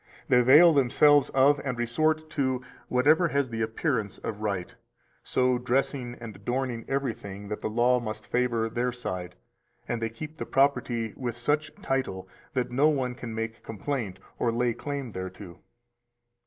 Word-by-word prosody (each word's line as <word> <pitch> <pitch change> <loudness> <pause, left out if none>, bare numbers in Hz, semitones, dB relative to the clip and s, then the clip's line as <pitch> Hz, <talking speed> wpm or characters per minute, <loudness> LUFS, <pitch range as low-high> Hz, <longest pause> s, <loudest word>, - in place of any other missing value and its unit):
they 125 - +6
avail 150 +8 +8
themselves 145 +1 +5
of, 140 +2 +4
and 130 -3 -2
resort 155 +7 +1
to, 135 -5 0 0.3
whatever 150 +7 +4
has 140 -4 0
the 115 0 -3
appearance 110 - -1
of 105 -2 -6
right, 100 -4 -2 0.5
so 125 -1 +1
dressing 125 0 -1
and 115 -4 -8
adorning 120 +3 -2
everything 105 -7 -3
that 105 - -3
the - - -3
law 120 +3 +3
must 110 -2 -6
favor 120 -2 +1
their 120 +2 -1
side, 90 -7 -5 0.5
and 120 -1 -2
they 115 - 0
keep 150 +7 -9
the - - -3
property 125 -5 +1
with 120 -3 -4
such 150 +5 0
title 95 -9 -2 0.3
that 125 -1 -1
no 140 +5 +4
one 130 -4 0
can 120 -2 -7
make 115 0 -4
complaint 115 -3 -4 0.2
or 120 - +2
lay 120 +1 +1
claim 140 0 -5
thereto. 95 -1 -8
125 Hz, 155 wpm, -27 LUFS, 115-135 Hz, 0.5 s, avail